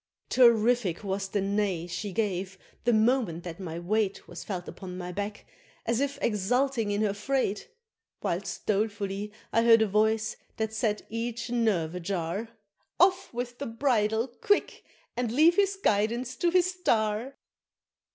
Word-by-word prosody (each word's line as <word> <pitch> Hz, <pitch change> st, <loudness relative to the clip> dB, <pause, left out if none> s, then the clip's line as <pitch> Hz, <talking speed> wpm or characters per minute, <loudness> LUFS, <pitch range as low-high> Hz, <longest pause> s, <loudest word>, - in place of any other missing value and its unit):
Terrific 235 Hz, -6 st, +4 dB
was 195 Hz, 0 st, -2 dB
the 200 Hz, +1 st, -1 dB
neigh 195 Hz, -3 st, 0 dB
she 185 Hz, +4 st, -4 dB
gave, 190 Hz, -2 st, -2 dB, 0.3 s
the 240 Hz, -, +4 dB
moment 220 Hz, -6 st, +2 dB
that 170 Hz, 0 st, -7 dB
my 170 Hz, -4 st, -5 dB
weight 200 Hz, +3 st, -1 dB
Was -, -, -8 dB
felt 180 Hz, -4 st, -5 dB
upon 180 Hz, -1 st, -8 dB
my 180 Hz, -1 st, -5 dB
back, 205 Hz, +3 st, -5 dB, 0.4 s
as 230 Hz, +1 st, +1 dB
if 280 Hz, 0 st, -1 dB
exulting 235 Hz, +3 st, +1 dB
in 205 Hz, +1 st, +1 dB
her 205 Hz, -2 st, +1 dB
freight; 255 Hz, -, -1 dB, 0.5 s
Whilst -, -, -3 dB
dolefully 205 Hz, -1 st, -1 dB, 0.2 s
I 230 Hz, -, +4 dB
heard 230 Hz, -1 st, +6 dB
a -, -, +1 dB
voice 220 Hz, +2 st, +1 dB, 0.2 s
that 220 Hz, 0 st, -2 dB
set 220 Hz, -1 st, 0 dB
each 235 Hz, +1 st, -3 dB
nerve 205 Hz, -9 st, +1 dB
ajar, 180 Hz, +3 st, -3 dB, 0.5 s
"Off 370 Hz, +2 st, +4 dB
with 245 Hz, 0 st, -5 dB
the 280 Hz, -, -3 dB
bridle 225 Hz, -2 st, +1 dB
quick! 335 Hz, +11 st, 0 dB, 0.3 s
and 245 Hz, -2 st, -1 dB
leave 315 Hz, +7 st, +5 dB
his 395 Hz, -1 st, +3 dB
guidance 235 Hz, -, 0 dB
to 345 Hz, -, +2 dB
his 365 Hz, +1 st, +3 dB
star!" 235 Hz, -, 0 dB
220 Hz, 150 wpm, -28 LUFS, 195-245 Hz, 0.5 s, heard